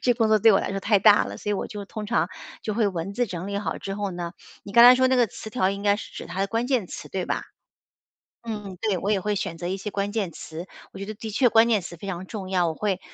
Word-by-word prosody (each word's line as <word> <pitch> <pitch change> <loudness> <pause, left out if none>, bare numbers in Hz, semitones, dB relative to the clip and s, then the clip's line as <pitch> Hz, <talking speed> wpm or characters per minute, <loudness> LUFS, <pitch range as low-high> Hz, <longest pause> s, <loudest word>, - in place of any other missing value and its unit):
这 245 - +3
工 225 -2 +2
作 215 0 +5
对 220 +2 +6
我 195 - +4
来 - - -3
说 195 - -2
太 200 +1 +2
大 210 +1 +6
了， - - -7
所 210 - -4
以 - - +2
我 - - -3
就 205 -1 -7
通 210 +1 -6
常 235 +3 +1 0.3
就 215 - -2
会 215 0 +2
文 185 0 -3
字 245 +3 +1
整 185 -1 -5
理 200 - -2
好 205 - -3
之 195 0 -5
后 205 -2 -2
呢 175 -1 -4 0.3
你 - - -10
刚 235 +2 +8
才 250 +1 +10
说 260 0 +3
那 260 - +3
个 245 -2 +4
词 220 - -9
条 190 -5 +1
应 200 0 -5
该 205 0 +3
是 220 - -9
指 - - -7
它 175 +2 -7
的 195 - +2
关 230 +4 -1
键 250 -9 +1
词， - - -8
对 185 -2 -3
吧？ - - -1 1.0
嗯 225 -2 -4
嗯， 190 -2 -8
对， 210 -5 +1
我 205 +4 0
也 195 - +1
会 210 +2 -1
选 190 -4 -3
择 175 +1 -4
一 190 - -1
些 200 +1 -6
关 200 0 -1
键 205 -5 -2
词， 160 +3 -8 0.3
我 - - -10
觉 195 - -5
得 215 - -5
的 220 +1 -7
确 245 +4 +3
关 225 +1 +5
键 220 -3 +3
词 175 -1 -8
非 195 +4 -8
常 185 0 -4
重 190 -2 -6
要。 180 -2 +2
我 160 - -1
会 195 -1 -1
200 Hz, 330 characters per minute, -25 LUFS, 190-220 Hz, 1.0 s, 才